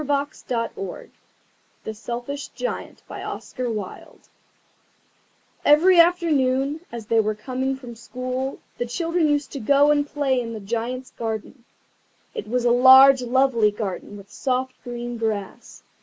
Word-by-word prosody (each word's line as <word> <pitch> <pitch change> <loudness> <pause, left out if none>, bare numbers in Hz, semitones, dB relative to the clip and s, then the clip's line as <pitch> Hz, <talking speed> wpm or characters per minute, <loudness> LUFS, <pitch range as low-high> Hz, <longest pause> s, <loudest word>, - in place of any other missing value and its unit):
[Picture: 260 -9 -3 0.7
The 220 - -5
Selfish 240 +6 -5
Giant] - - -6 2.6
EVERY 340 +5 +6
afternoon, 300 -5 +3
as 235 -2 -7
they 225 +1 +2
were 215 0 +1
coming 260 +4 -2
from 245 -3 -10
school, 255 +3 -4 0.2
the 240 - -1
children 330 +5 0
used 290 -2 0
to 280 - -5
go 280 +5 +4
and 290 -1 +2
play 275 -4 0
in 230 -1 -5
the 220 - -6
Giant's 235 +5 -4
garden. 225 +2 -5 0.7
It 210 - -6
was 245 +2 -1
a 240 - +4
large 260 +2 +8
lovely 250 -3 +3
garden, 205 -1 -5
with 200 0 -14
soft 260 -1 -1
green 240 -1 -5
grass. 210 -4 -4
255 Hz, 125 wpm, -23 LUFS, 230-280 Hz, 2.6 s, large